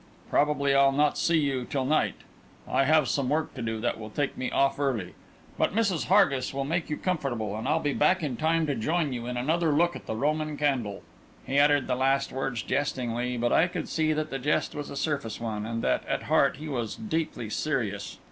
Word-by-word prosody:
Probably 145 Hz, -1 st, +2 dB
I'll 140 Hz, 0 st, +5 dB
not 145 Hz, +1 st, +2 dB
see 170 Hz, -1 st, +2 dB
you 140 Hz, -4 st, 0 dB
till 130 Hz, +1 st, -2 dB
night; 155 Hz, +3 st, +1 dB, 0.5 s
I 135 Hz, -, +2 dB
have 155 Hz, -1 st, +4 dB
some 135 Hz, -1 st, 0 dB
work 155 Hz, +1 st, 0 dB
to 130 Hz, -, -7 dB
do 110 Hz, -1 st, -2 dB
that 120 Hz, -1 st, -1 dB
will 110 Hz, -1 st, -7 dB
take 145 Hz, +5 st, -2 dB
me 130 Hz, -, -3 dB
off 140 Hz, 0 st, +1 dB
early. 120 Hz, -11 st, -1 dB, 0.5 s
But -, -, +1 dB
Mrs. 200 Hz, -7 st, +1 dB
Hargis 140 Hz, -10 st, +3 dB
will 135 Hz, -, -1 dB
make 165 Hz, +3 st, -1 dB
you 150 Hz, -, -2 dB
comfortable, 125 Hz, -, -2 dB
and 110 Hz, +4 st, -4 dB
I'll 150 Hz, -, +2 dB
be 145 Hz, -1 st, -1 dB
back 180 Hz, +4 st, +2 dB
in 140 Hz, -5 st, -2 dB
time 160 Hz, +3 st, +1 dB
to 145 Hz, -, 0 dB
join 155 Hz, +4 st, 0 dB
you 120 Hz, -1 st, -5 dB
in 125 Hz, 0 st, -3 dB
another 160 Hz, +6 st, +1 dB
look 170 Hz, +4 st, +2 dB
at -, -, -10 dB
the -, -, -2 dB
Roman 155 Hz, +4 st, -1 dB
candle!" 130 Hz, -9 st, -1 dB, 0.4 s
He 140 Hz, +1 st, +1 dB
uttered 145 Hz, -1 st, +4 dB
the -, -, -1 dB
last 135 Hz, +2 st, +1 dB
words 130 Hz, -3 st, -3 dB
jestingly, 125 Hz, -3 st, -1 dB
but 120 Hz, 0 st, +1 dB
I 175 Hz, -, +5 dB
could 180 Hz, -3 st, -4 dB
see 155 Hz, -1 st, +1 dB
that 155 Hz, 0 st, -2 dB
the 135 Hz, -, -3 dB
jest 150 Hz, +4 st, 0 dB
was 145 Hz, -1 st, -5 dB
a -, -, -7 dB
surface 140 Hz, -6 st, -2 dB
one, 110 Hz, -2 st, -3 dB
and 115 Hz, 0 st, -3 dB
that, -, -, +1 dB
at -, -, -1 dB
heart, -, -, +2 dB
he 155 Hz, +2 st, -7 dB
was 120 Hz, -6 st, -3 dB
deeply 160 Hz, -, -3 dB
serious. 105 Hz, -11 st, -2 dB
140 Hz, 220 wpm, -27 LUFS, 125-155 Hz, 0.5 s, I'll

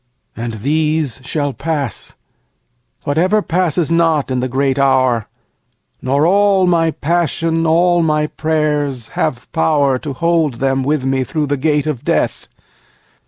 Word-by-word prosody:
And 115 Hz, 0 st, -5 dB
these 150 Hz, -3 st, 0 dB
shall 145 Hz, 0 st, -2 dB
pass, 145 Hz, -, -4 dB, 0.9 s
Whatever 185 Hz, +9 st, +1 dB
passes 170 Hz, -2 st, 0 dB
not, 165 Hz, -5 st, +2 dB
in 130 Hz, -, 0 dB
the 130 Hz, -, -1 dB
great 135 Hz, +1 st, 0 dB
hour, 130 Hz, -4 st, +2 dB, 0.7 s
Nor 140 Hz, +4 st, +1 dB
all 195 Hz, +1 st, +3 dB
my 165 Hz, -2 st, +2 dB
passion, 165 Hz, +1 st, -1 dB
all 175 Hz, +2 st, +3 dB
my 150 Hz, -2 st, +1 dB
prayers, 150 Hz, -6 st, -1 dB
have 125 Hz, -1 st, -3 dB
power 145 Hz, -5 st, +1 dB
To 145 Hz, +1 st, -5 dB
hold 165 Hz, -2 st, +1 dB
them 135 Hz, +2 st, 0 dB
with 145 Hz, -1 st, -1 dB
me 135 Hz, 0 st, 0 dB
through 150 Hz, +3 st, -2 dB
the 145 Hz, 0 st, -1 dB
gate 150 Hz, +1 st, 0 dB
of 150 Hz, -6 st, -3 dB
Death. -, -, -1 dB
150 Hz, 135 wpm, -16 LUFS, 135-165 Hz, 0.9 s, all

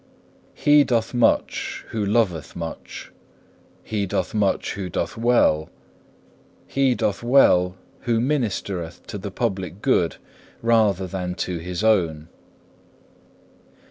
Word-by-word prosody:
2. -, -, -21 dB
He 145 Hz, 0 st, +7 dB
doth 115 Hz, -4 st, 0 dB
much 120 Hz, -1 st, +1 dB
who 110 Hz, -2 st, -2 dB
loveth 100 Hz, -, 0 dB
much. 85 Hz, -1 st, -7 dB, 0.7 s
He 105 Hz, -2 st, -2 dB
doth 95 Hz, -, -2 dB
much 105 Hz, -3 st, 0 dB
who 95 Hz, -2 st, -5 dB
doth -, -, -3 dB
well. 115 Hz, -10 st, +2 dB, 1.0 s
He 135 Hz, -2 st, +1 dB
doth 100 Hz, -, -1 dB
well 95 Hz, -8 st, +4 dB, 0.3 s
who 115 Hz, -1 st, +3 dB
ministereth 100 Hz, -, -2 dB
to 105 Hz, -, -6 dB
the 100 Hz, +1 st, -5 dB
public 95 Hz, -4 st, -3 dB
good -, -, +2 dB, 0.5 s
rather 110 Hz, -5 st, +3 dB
than 90 Hz, -1 st, -4 dB
to 90 Hz, -1 st, -3 dB
his 90 Hz, +3 st, -4 dB
own. 85 Hz, -8 st, +1 dB
100 Hz, 115 wpm, -23 LUFS, 90-115 Hz, 1.0 s, He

